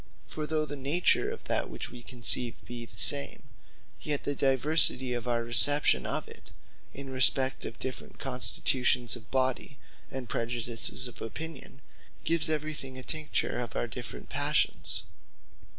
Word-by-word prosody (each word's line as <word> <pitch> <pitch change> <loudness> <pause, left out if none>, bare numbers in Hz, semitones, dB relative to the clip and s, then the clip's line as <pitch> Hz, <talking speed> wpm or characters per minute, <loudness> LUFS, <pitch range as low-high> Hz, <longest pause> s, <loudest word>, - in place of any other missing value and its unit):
For 155 -1 -6
though 155 -1 0
the 145 - -7
nature 145 +6 +1
of - - -8
that - - -1
we 120 0 -6
conceive, 120 -1 0
be 120 -1 -8
the - - -18
same; 70 0 +2 0.6
yet 145 -2 -3
the 145 - -2
diversity 135 -1 +4
of 120 0 -4
our 120 -1 0
reception 120 - +4
of - - -2
it, - - -12 0.4
in 135 -1 -9
respect 130 +1 +3
of - - -7
different 130 -1 -7
constitutions 125 -1 +3
of 120 - -13
body, 130 +1 -1 0.3
and 130 -2 -6
prejudices 120 +2 -2
of 120 - -13
opinion, 140 +3 -7 0.4
gives 165 -1 +2
everything 150 -4 -4
a 130 - -7
tincture 155 -4 -2
of 120 -2 -5
our - - -1
different - - -7
passions. - - 0
130 Hz, 145 wpm, -29 LUFS, 120-145 Hz, 0.6 s, diversity